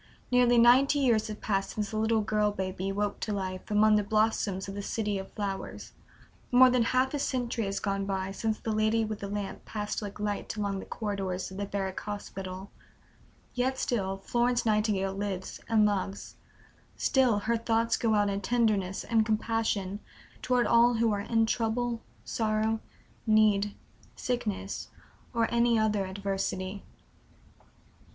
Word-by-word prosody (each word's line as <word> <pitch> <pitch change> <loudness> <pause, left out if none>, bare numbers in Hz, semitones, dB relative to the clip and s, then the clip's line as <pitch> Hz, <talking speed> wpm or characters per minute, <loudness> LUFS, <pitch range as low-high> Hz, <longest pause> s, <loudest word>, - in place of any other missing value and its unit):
Nearly 245 -1 +5
ninety 255 +5 +6
years 235 -5 +2
have 215 -1 -7
passed 195 -2 -1
since 210 -2 -2
the 215 - -3
little 220 0 +2
girl 210 0 +1
baby 190 0 -3
woke 205 +1 -2
to 215 - -3
life 185 -2 -4
among 210 0 +5
the 210 - +1
blossoms 210 -2 0
of 195 - -5
the 205 - -4
City 210 -1 -2
of 190 - -8
Flowers; 200 -2 -5 0.6
more 255 +1 +7
than 250 -1 +3
half 255 +3 +1
a 290 - -1
century 245 -4 -1
has 195 0 -2
gone 195 -1 -2
by 190 -1 -2
since 215 +2 -1
the 225 - -4
Lady 215 +1 +2
with 215 -1 -4
the 200 - -5
Lamp 205 -1 -5
passed 210 0 -4
like 205 0 -7
light 210 0 -3
along 200 -2 -1
the - - -8
corridors 195 -4 -3
of 190 - -8
the 200 0 -3
Barrack 195 -2 -3
Hospital; 195 -2 -6 0.8
yet 260 +1 0
still 195 -5 -1
Florence 240 +5 0
Nightingale 210 -3 +1
lives 195 -1 -4
and 220 -2 +5
loves, 200 -1 -2 0.6
still 255 -5 +3
her 220 +3 0
thoughts 230 0 +1
go 225 -2 +1
out 205 0 +3
in 200 0 -1
tenderness 210 -5 +1
and 225 -2 +2
compassion 215 -3 -1 0.4
toward 250 -1 +2
all 235 +1 +5
who 225 0 +2
are 205 -1 -1
"in 225 +2 +2
trouble, 230 +1 -1 0.2
sorrow, 220 0 0 0.5
need, 210 -2 +3 0.4
sickness, 210 -5 -3 0.4
or 230 -2 +1
any 235 0 +3
other 210 -3 +1
adversity." 195 0 -3
210 Hz, 160 wpm, -29 LUFS, 195-230 Hz, 0.8 s, more